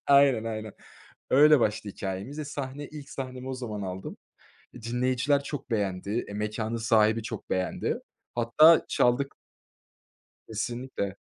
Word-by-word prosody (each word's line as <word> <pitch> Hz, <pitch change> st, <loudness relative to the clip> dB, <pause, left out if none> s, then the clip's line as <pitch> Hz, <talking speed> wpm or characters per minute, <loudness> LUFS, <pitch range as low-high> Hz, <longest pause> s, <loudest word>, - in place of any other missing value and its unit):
Aynen 140 Hz, -5 st, +5 dB
aynen, 110 Hz, -2 st, -4 dB, 0.6 s
öyle 150 Hz, +1 st, +7 dB
başladı 105 Hz, -2 st, 0 dB
hikâyemiz. 100 Hz, +9 st, -5 dB
Eee, 155 Hz, -, -3 dB
sahne, 140 Hz, 0 st, -5 dB
ilk 145 Hz, -2 st, -10 dB
sahnemi 130 Hz, -1 st, -6 dB
o 130 Hz, -, -2 dB
zaman 110 Hz, -5 st, -5 dB
aldım. 95 Hz, 0 st, -5 dB, 0.6 s
Eee, 120 Hz, -, -11 dB
dinleyiciler 125 Hz, +4 st, +1 dB
çok 140 Hz, -2 st, -6 dB
beğendi. 100 Hz, +1 st, -1 dB
Eee, -, -, -8 dB
mekânın 105 Hz, +2 st, -2 dB
sahibi 110 Hz, -1 st, +3 dB
çok 110 Hz, -1 st, -6 dB
beğendi. 95 Hz, 0 st, -1 dB, 0.4 s
Hatta 120 Hz, +8 st, +6 dB
çaldık. 135 Hz, +3 st, +2 dB, 1.1 s
Kesinlikle. 115 Hz, -3 st, -4 dB
120 Hz, 125 wpm, -28 LUFS, 105-135 Hz, 1.1 s, öyle